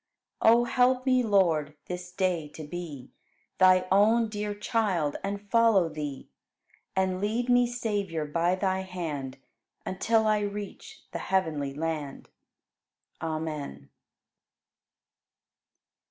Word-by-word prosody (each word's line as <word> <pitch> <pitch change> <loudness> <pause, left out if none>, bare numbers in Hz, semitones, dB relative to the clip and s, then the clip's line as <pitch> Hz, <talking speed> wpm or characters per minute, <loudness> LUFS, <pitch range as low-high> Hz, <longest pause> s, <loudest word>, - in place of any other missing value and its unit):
4. 225 - +7
O 235 +1 +5
help 250 +1 +2
me, 255 -1 +4
Lord, 170 -9 +2
this 180 0 -6
day 180 -4 0
to 160 - -7
be 150 -4 -7 0.5
Thy 185 0 +5
own 220 +4 +4
dear 210 -1 -3
child 205 - 0
and 200 +1 -4
follow 225 -7 +4
Thee; 150 -3 -6 0.7
And 190 -1 0
lead 230 +4 -1
me, 245 0 +5
Savior, 205 -9 -2
by 170 +4 +1
Thy 190 0 0
hand 160 -8 -5 0.5
Until 220 +4 +1
I 215 -1 +3
reach 205 -1 -6
the - - -4
heavenly 155 -7 -1
land. 155 -3 -4 0.9
Amen. 155 - -4
185 Hz, 110 wpm, -28 LUFS, 160-215 Hz, 0.9 s, 4